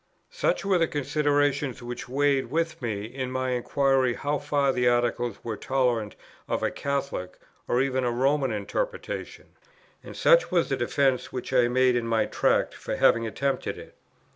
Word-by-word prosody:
Such -, -, 0 dB
were 190 Hz, -2 st, +3 dB
the 165 Hz, -, +3 dB
considerations 145 Hz, -3 st, 0 dB
which 120 Hz, +1 st, -6 dB
weighed 140 Hz, 0 st, +1 dB
with 165 Hz, 0 st, -1 dB
me 105 Hz, -4 st, -3 dB
in 130 Hz, +2 st, -5 dB
my 130 Hz, 0 st, -1 dB
inquiry 130 Hz, 0 st, +1 dB
how 145 Hz, +1 st, -1 dB
far 145 Hz, -2 st, +1 dB
the 125 Hz, -1 st, +1 dB
Articles 120 Hz, -2 st, 0 dB
were 115 Hz, -2 st, -3 dB
tolerant 120 Hz, -3 st, 0 dB, 0.3 s
of -, -, -2 dB
a -, -, +1 dB
Catholic, 140 Hz, -10 st, -3 dB, 0.3 s
or 125 Hz, +2 st, +2 dB
even 130 Hz, -1 st, -1 dB
a 125 Hz, -, +1 dB
Roman 135 Hz, +2 st, +1 dB
interpretation; 480 Hz, -, -4 dB, 0.5 s
and -, -, -10 dB
such -, -, +5 dB
was -, -, +1 dB
the -, -, +1 dB
defence 135 Hz, -3 st, 0 dB
which 130 Hz, +1 st, -5 dB
I 125 Hz, -2 st, +4 dB
made 125 Hz, 0 st, +3 dB
in 120 Hz, -1 st, -1 dB
my 115 Hz, -1 st, +2 dB
Tract -, -, +1 dB
for -, -, -5 dB
having 115 Hz, -1 st, +3 dB
attempted 140 Hz, +5 st, -2 dB
it. -, -, -12 dB
130 Hz, 165 wpm, -26 LUFS, 120-145 Hz, 0.5 s, such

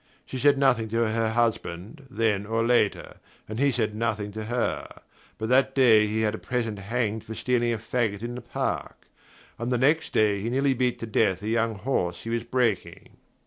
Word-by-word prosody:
She 130 Hz, -, -6 dB
said 145 Hz, +1 st, +4 dB
nothing 130 Hz, -5 st, +3 dB
to 115 Hz, +1 st, +1 dB
her 110 Hz, 0 st, 0 dB
husband, 115 Hz, -, -2 dB
then 110 Hz, -5 st, 0 dB
or 115 Hz, +1 st, 0 dB
later, 120 Hz, -4 st, +1 dB, 0.3 s
and 110 Hz, +2 st, -5 dB
he 140 Hz, +1 st, +4 dB
said 110 Hz, -4 st, -1 dB
nothing 110 Hz, -2 st, -2 dB
to 110 Hz, +1 st, -6 dB
her; 120 Hz, +2 st, -3 dB, 0.3 s
but 110 Hz, -, -3 dB
that 135 Hz, +1 st, +3 dB
day 115 Hz, -5 st, +6 dB
he 110 Hz, +1 st, -1 dB
had 110 Hz, -1 st, +1 dB
a -, -, -5 dB
peasant 115 Hz, -4 st, -2 dB
hanged 110 Hz, +1 st, -2 dB
for 110 Hz, -, -8 dB
stealing 120 Hz, -1 st, +1 dB
a 115 Hz, -, -1 dB
faggot 110 Hz, -2 st, -2 dB
in 120 Hz, +1 st, -4 dB
the 125 Hz, -, -6 dB
park, 120 Hz, -, -4 dB, 0.5 s
and 120 Hz, +1 st, -2 dB
the 125 Hz, -, +2 dB
next 150 Hz, +6 st, +2 dB
day 105 Hz, -2 st, +2 dB
he 115 Hz, -, -2 dB
nearly 135 Hz, +2 st, +2 dB
beat 125 Hz, -1 st, 0 dB
to -, -, -2 dB
death 105 Hz, -3 st, +1 dB
a 105 Hz, -, -2 dB
young 115 Hz, 0 st, +1 dB
horse 90 Hz, -7 st, -2 dB
he 115 Hz, -, -5 dB
was 115 Hz, 0 st, -1 dB
breaking. 120 Hz, -4 st, -2 dB
115 Hz, 200 wpm, -26 LUFS, 110-125 Hz, 0.5 s, day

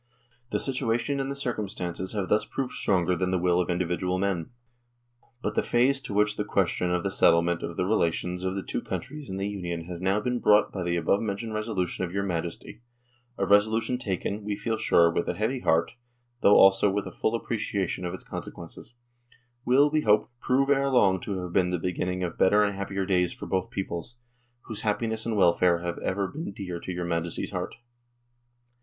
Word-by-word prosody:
The -, -, 0 dB
situation 130 Hz, +1 st, 0 dB
and 135 Hz, 0 st, -2 dB
the 140 Hz, -, -3 dB
circum 120 Hz, -7 st, -3 dB
stances 90 Hz, +1 st, -3 dB
have 100 Hz, -3 st, -2 dB
thus 105 Hz, 0 st, +2 dB
proved 130 Hz, +3 st, -4 dB
stronger 90 Hz, -2 st, +1 dB
than 90 Hz, +1 st, -1 dB
the 95 Hz, -, +1 dB
will 90 Hz, 0 st, +2 dB
of 90 Hz, -, -3 dB
individual 90 Hz, +1 st, -1 dB
men. 95 Hz, -4 st, -1 dB, 0.9 s
But -, -, -1 dB
the -, -, +2 dB
phase 130 Hz, +3 st, +2 dB
to 130 Hz, -6 st, -5 dB
which 105 Hz, 0 st, +2 dB
the 105 Hz, -, 0 dB
ques 95 Hz, -4 st, +1 dB
tion 90 Hz, -1 st, -1 dB
of 90 Hz, -1 st, 0 dB
the 100 Hz, -, -1 dB
settlement 85 Hz, -2 st, +3 dB
of 85 Hz, -, -5 dB
the 90 Hz, -, +1 dB
relations 90 Hz, -2 st, 0 dB
of 95 Hz, 0 st, -1 dB
the 95 Hz, -, -3 dB
two -, -, -3 dB
countries 150 Hz, -2 st, -6 dB
in 95 Hz, -, -4 dB
the 100 Hz, +1 st, -2 dB
Union 90 Hz, -4 st, -4 dB
has 85 Hz, 0 st, -7 dB
now 95 Hz, +2 st, +2 dB
been 125 Hz, +3 st, -1 dB
brought 105 Hz, -1 st, +4 dB
by 95 Hz, -, -5 dB
the 85 Hz, -1 st, 0 dB
above 85 Hz, +4 st, +1 dB
mentioned 110 Hz, +1 st, -3 dB
resolution 105 Hz, -5 st, -2 dB
of 85 Hz, -, -3 dB
your 100 Hz, +1 st, -1 dB
Majesty 85 Hz, +3 st, -4 dB, 0.6 s
a -, -, 0 dB
resolution 110 Hz, +4 st, +3 dB
taken, 100 Hz, -1 st, -3 dB
we 105 Hz, 0 st, -2 dB
feel 115 Hz, +2 st, -2 dB
sure, 85 Hz, -5 st, +4 dB
with 85 Hz, -, -1 dB
a -, -, -1 dB
heavy 115 Hz, +5 st, -1 dB
heart, 80 Hz, -7 st, +2 dB, 0.5 s
though 100 Hz, -, +6 dB
also 95 Hz, +1 st, +6 dB
with 100 Hz, +1 st, -1 dB
a -, -, -6 dB
full 110 Hz, -, -1 dB
appreciation 100 Hz, -6 st, -2 dB
of 90 Hz, +1 st, -3 dB
its -, -, -10 dB
consequences 120 Hz, -, -9 dB, 0.7 s
will, 140 Hz, +4 st, +4 dB
we 155 Hz, 0 st, +2 dB
hope, 105 Hz, -2 st, +3 dB
prove 135 Hz, +3 st, +2 dB
ere 140 Hz, 0 st, +3 dB
long 100 Hz, -8 st, +4 dB
to 100 Hz, +2 st, -4 dB
have 90 Hz, -1 st, -6 dB
been 90 Hz, -2 st, +3 dB
the 90 Hz, -, 0 dB
beginning 90 Hz, +1 st, -2 dB
of 85 Hz, -, -4 dB
better 105 Hz, +2 st, +5 dB
and 105 Hz, -1 st, 0 dB
happier 100 Hz, 0 st, -3 dB
days 90 Hz, -2 st, +1 dB
for -, -, -8 dB
both 95 Hz, -1 st, -1 dB
peoples, 95 Hz, +3 st, -5 dB, 0.5 s
whose 110 Hz, -2 st, -3 dB
happiness 110 Hz, +1 st, -1 dB
and 110 Hz, -2 st, -1 dB
welfare 85 Hz, -1 st, +4 dB
have 85 Hz, 0 st, -4 dB
ever 100 Hz, +1 st, -1 dB
been 155 Hz, -, -6 dB
dear 90 Hz, -3 st, -6 dB
to 90 Hz, -, -6 dB
your 90 Hz, 0 st, -3 dB
Majesty's 85 Hz, -1 st, -2 dB
heart. -, -, -4 dB
95 Hz, 205 wpm, -27 LUFS, 90-110 Hz, 0.9 s, though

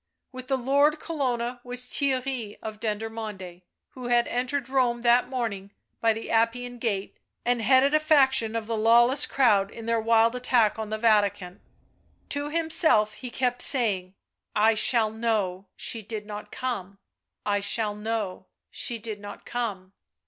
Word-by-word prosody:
With 255 Hz, -1 st, -9 dB
the 270 Hz, -1 st, +1 dB
Lord 285 Hz, +4 st, +2 dB
Colonna 250 Hz, -7 st, -3 dB
was 250 Hz, 0 st, 0 dB
Theirry 255 Hz, -5 st, 0 dB
of 215 Hz, -1 st, -6 dB
Dendermonde, 215 Hz, -5 st, -5 dB, 0.3 s
who 250 Hz, -2 st, -8 dB
had 240 Hz, -1 st, +2 dB
entered 255 Hz, +1 st, -2 dB
Rome 250 Hz, -3 st, +1 dB
that 240 Hz, +1 st, +4 dB
morning 220 Hz, -7 st, -3 dB, 0.3 s
by 230 Hz, -, +3 dB
the 225 Hz, +1 st, -5 dB
Appian 240 Hz, +2 st, 0 dB
Gate 205 Hz, -5 st, -3 dB, 0.3 s
and 245 Hz, -1 st, +1 dB
headed 265 Hz, +4 st, +4 dB
a 305 Hz, -, +5 dB
faction 265 Hz, -7 st, +3 dB
of 225 Hz, -1 st, -2 dB
the 230 Hz, +1 st, -3 dB
lawless 240 Hz, +5 st, +4 dB
crowd 205 Hz, -7 st, +3 dB
in 230 Hz, +1 st, -10 dB
their 230 Hz, -1 st, +1 dB
wild 230 Hz, +1 st, +3 dB
attack 240 Hz, -4 st, +2 dB
on 220 Hz, -1 st, -4 dB
the 215 Hz, -, -2 dB
Vatican. 205 Hz, -4 st, +1 dB, 0.7 s
To 285 Hz, +1 st, -3 dB
himself 315 Hz, -9 st, +2 dB
he 250 Hz, +3 st, -8 dB
kept 245 Hz, 0 st, -1 dB
saying: 215 Hz, -9 st, +3 dB
u 185 Hz, -, -29 dB, 0.4 s
I 215 Hz, +1 st, +4 dB
shall 220 Hz, 0 st, +2 dB
know, 210 Hz, -4 st, -2 dB
she 225 Hz, -, -2 dB
did 215 Hz, 0 st, -7 dB
not 210 Hz, 0 st, -8 dB
come; 200 Hz, -7 st, -4 dB, 0.5 s
I 205 Hz, -1 st, +1 dB
shall 210 Hz, +1 st, 0 dB
know, 210 Hz, -3 st, -4 dB, 0.2 s
she 240 Hz, -, -2 dB
did 220 Hz, -2 st, -7 dB
not 205 Hz, 0 st, -10 dB
come." 200 Hz, -6 st, -4 dB
230 Hz, 155 wpm, -26 LUFS, 210-250 Hz, 0.7 s, a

